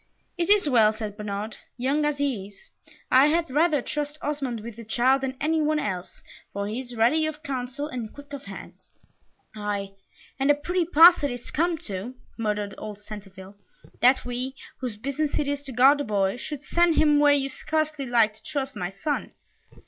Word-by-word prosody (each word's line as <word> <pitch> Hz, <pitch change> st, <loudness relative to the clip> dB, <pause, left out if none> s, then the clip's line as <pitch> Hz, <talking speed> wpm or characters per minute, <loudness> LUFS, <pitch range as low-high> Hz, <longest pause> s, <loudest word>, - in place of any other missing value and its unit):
"It 340 Hz, +1 st, -1 dB
is 410 Hz, -5 st, +5 dB
well," 225 Hz, -6 st, +5 dB
said 215 Hz, -2 st, -6 dB
Bernard: 210 Hz, +1 st, -5 dB, 0.2 s
"young 275 Hz, +4 st, +1 dB
as 295 Hz, -1 st, 0 dB
he 265 Hz, -9 st, -1 dB
is, 200 Hz, -1 st, -20 dB, 0.4 s
I 265 Hz, +3 st, +7 dB
had 325 Hz, -1 st, +1 dB
rather 300 Hz, -1 st, +2 dB
trust 295 Hz, 0 st, -3 dB
Osmond 275 Hz, -6 st, -2 dB
with 230 Hz, 0 st, -9 dB
the 230 Hz, -, -8 dB
child 250 Hz, +4 st, +2 dB
than 265 Hz, 0 st, -3 dB
any 315 Hz, +2 st, +1 dB
one 305 Hz, 0 st, +2 dB
else, 190 Hz, -10 st, -4 dB, 0.3 s
for 200 Hz, 0 st, -3 dB
he 220 Hz, +4 st, -3 dB
is 250 Hz, -2 st, -7 dB
ready 295 Hz, +8 st, +3 dB
of 310 Hz, 0 st, -6 dB
counsel, 265 Hz, 0 st, -4 dB
and 245 Hz, -7 st, -5 dB
quick 285 Hz, 0 st, -13 dB
of 280 Hz, 0 st, -7 dB
hand." -, -, -10 dB, 0.7 s
"Ay, 205 Hz, -2 st, -3 dB, 0.5 s
and 270 Hz, +1 st, +2 dB
a 290 Hz, -, +6 dB
pretty 350 Hz, +4 st, -1 dB
pass 335 Hz, 0 st, +7 dB
it 285 Hz, -, +2 dB
is 245 Hz, -1 st, -6 dB
come 335 Hz, +2 st, +1 dB
to," 200 Hz, +5 st, -5 dB, 0.2 s
muttered 210 Hz, -3 st, -2 dB
old 210 Hz, -1 st, -7 dB
Centeville, 200 Hz, -2 st, -11 dB, 0.4 s
"that 255 Hz, +2 st, +4 dB
we, 250 Hz, +2 st, -3 dB, 0.2 s
whose 245 Hz, -5 st, -4 dB
business 280 Hz, +6 st, -2 dB
it 290 Hz, -, 0 dB
is 285 Hz, 0 st, -1 dB
to 270 Hz, -, -6 dB
guard 265 Hz, +4 st, +5 dB
the -, -, 0 dB
boy, 200 Hz, -4 st, 0 dB
should 290 Hz, +3 st, -6 dB
send 340 Hz, +1 st, +3 dB
him 300 Hz, -2 st, +4 dB
where 290 Hz, 0 st, +6 dB
you 275 Hz, -1 st, 0 dB
scarcely 305 Hz, 0 st, -2 dB
like 230 Hz, -3 st, +3 dB
to 215 Hz, -, -19 dB
trust 275 Hz, -2 st, -4 dB
my 180 Hz, -, -3 dB
son." 285 Hz, +10 st, -3 dB
265 Hz, 195 wpm, -25 LUFS, 215-295 Hz, 0.7 s, I